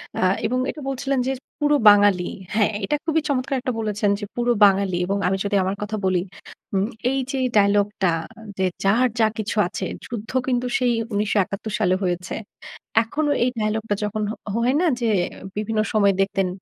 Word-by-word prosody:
অ্যা 185 - +2 0.2
এবং 255 +2 0
এটা 300 - -6
বলছিলেন 270 0 -1
যে - - +1 0.3
পুরো 295 0 +3
বাঙালি 205 -3 +4 0.3
হ্যাঁ 210 -1 +3
এইটা 295 - +1
খুবই 320 -1 +2
চমৎকার 270 -1 -1
একটা 255 -2 -2
বলেছেন 210 -1 0
যে 205 - -4
পুরো 240 0 +1
বাঙালি 195 -2 +2
এবং 200 +2 -1
আমি 190 +1 +1
যদি 200 0 -1
আমার 190 +2 -1
কথা 210 +1 -3
বলি। 185 -2 +2 0.5
উম 195 +2 +1 0.2
এই 270 - 0
যে 275 - -3
এই - - +2
ডায়ালগটা 200 -2 +3 0.5
যে, 190 - +1 0.2
"যার 230 +6 +4
যা 220 - +5
কিছু 215 0 -3
আছে।" 190 - -4 0.2
যুদ্ধ 225 -2 -6 0.2
কিন্তু 250 -1 0
সেই 245 -2 +2 0.2
১৯৭১ 205 0 0
সালে 185 -3 +3
হয়েছে। 180 0 -2 0.7
এখনো 295 +6 -1
এই 250 - +2
ডায়ালগটা 215 0 -1
যখন 210 +1 -2
হ - - -4 0.3
হয় 255 +3 +2
না - - +2 0.2
যে 230 - +1 0.5
বিভিন্ন 215 +1 -1
সময় 200 -2 +4
দেখতেন? 195 -1 +1
210 Hz, 175 wpm, -22 LUFS, 195-245 Hz, 0.7 s, যা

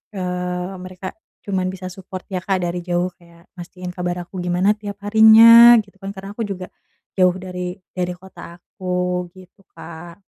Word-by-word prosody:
eee, 180 0 -3
mereka 185 +1 -8 0.3
cuman 190 -2 -1
bisa 185 -1 -7
support 185 0 -9
ya 190 - -3
Kak 190 -1 0
dari 175 +1 -3
jauh, 175 0 0
kayak 170 0 -21
mastiin 180 +1 -8
kabar 180 0 -4
aku 190 - -9
gimana 180 +3 +2
tiap 205 -1 -7
harinya 225 +2 +9
gitu 200 -1 -24
kan 195 0 -5
karena 195 0 -9
aku 230 - -2
juga 185 -3 -6 0.5
jauh 180 -1 +4
dari 180 0 -6 0.2
dari 180 -1 -2
kota 175 -2 -13
aku 180 -1 -3
gitu 185 +1 -18
Kak. 170 +3 -11
185 Hz, 160 wpm, -20 LUFS, 180-195 Hz, 0.5 s, harinya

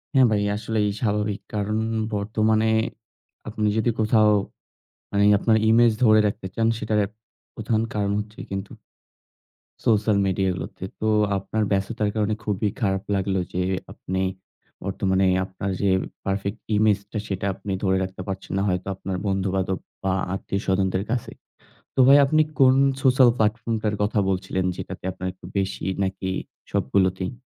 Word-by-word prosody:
হ্যাঁ, 130 - +7
ভাই 105 -1 +2
আসলেই 105 -1 -1
স্বাভাবিক। 105 -2 0
কারণ 105 +1 -1 0.3
বর্তমানে 110 +2 +1 0.8
আপনি 105 0 -1
যদি 115 +2 +2
কোথাও 110 0 +4 0.8
মানে 100 0 +2 0.2
আপনার 110 0 +3
image 115 -1 +5
ধরে 110 -1 +6
রাখতে 100 -1 -4
চান, 115 0 +2
সেটার 110 0 0
এক 100 - -10 0.4
প্রধান 110 0 0
কারণ 100 -1 0
হচ্ছে 105 +1 -8
কিন্তু 95 +1 -4 1.1
social 105 -2 +3
media 95 +1 +1
গুলোতে। 90 - -7 0.2
তো 110 - 0 0.3
আপনার 105 +3 -2
ব্যস্ততার 105 +2 0
কারণে 105 0 +1
খুবই 105 0 0
খারাপ 95 -2 0
লাগলো 95 0 0
যে 90 - 0 0.3
আপনি 95 +1 -3 0.6
বর্তমানে 95 0 +1 0.2
আপনার 95 +1 -4
যে 100 - +2 0.4
perfect 100 +2 -2 0.2
image 105 -1 +3
টা, - - -3
সেটা 95 0 -3
আপনি 100 +1 -7
ধরে 95 0 +2
রাখতে 95 0 -6
পারছেন 95 0 -5
ন। - - +1
হয়তো 90 +1 -2
আপনার 95 0 -4
বন্ধুবান্ধব 95 -1 0 0.3
বা 95 -1 +1 0.2
আত্মীয়-স্বজনদের 95 -1 -1
কাছে। 120 -2 -2 0.6
তো - - +1
ভাই 140 +1 +8
আপনি 155 +2 +4 0.2
কোনো 130 0 +6 0.2
social 130 -2 +6
platform 115 +1 0
টার 105 -1 0
কথা 105 +1 0
বলছিলেন 95 0 -1
যেটাতে - - -7
আপনার 95 0 -5
একটু 90 - -14
বেশি 95 0 -2 0.2
নাকি 95 0 -2 0.4
সবগুলোতেই? 95 +5 +1
100 Hz, 145 wpm, -24 LUFS, 95-110 Hz, 1.1 s, ভাই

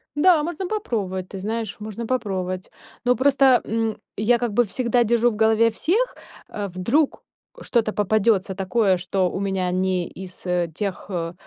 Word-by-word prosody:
Да, 315 0 +5
можно 345 +3 -3
попробовать, 200 - -3
ты 195 - -7
знаешь, 220 +1 -3
можно 220 +2 -6
попробовать. 185 -7 -2 0.3
Но 250 0 +3
просто, 265 -2 +4
м, 225 0 -1 0.2
я 235 +3 +3
как 235 -3 -2
бы 240 - +4
всегда 240 +2 +1
держу 235 +1 +3
в - - -6
голове 220 +1 +4
всех, 425 - 0 0.3
э, 205 -1 -4
вдруг 230 - 0 0.4
что-то 225 -3 0
попадётся 205 -2 +1
такое, 195 0 +2
что 185 0 0
у - - -4
меня 190 -2 -1
не 185 -1 0
из, 185 0 -9
э, 175 -2 0
тех, 200 +1 -4
э, 170 -2 -3
215 Hz, 160 wpm, -23 LUFS, 190-240 Hz, 0.4 s, Да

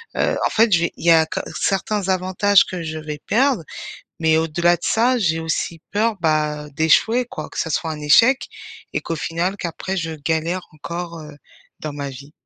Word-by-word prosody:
Heu, - - +1
en - - +2
fait 225 0 +3
j'ai 170 -2 +3
il - - -8
y - - +8
a 160 -1 +6
que - - -4 0.2
certains 195 +1 0
avantages, 185 +2 +3
que 180 -2 -5
je 160 -1 -5
vais 150 -1 -6
perdre. 255 -4 +2 0.6
Mais 160 -1 +3
au-delà 170 +2 +2
de - - -27
ça, 245 +3 +2
j'ai 165 -6 +1
aussi 160 +1 -2
peur, 215 +2 +1
bah, 150 -2 0
d'échouer 225 +10 +3
quoi. - - -7
Que - - -9
ça 160 - -1
soit 160 +1 -1
un 155 - -5
échec 230 - +5 0.5
et - - -1
qu'au 165 - -4
final, 170 +5 -2
qu'après 185 +1 -4
je 165 -3 -2
galère 160 +4 -2
encore, 170 +2 -6
heu, 150 -1 -11 0.5
dans 155 -1 -5
ma 140 -1 -5
vie. 140 +3 -12
165 Hz, 195 wpm, -21 LUFS, 155-190 Hz, 0.6 s, y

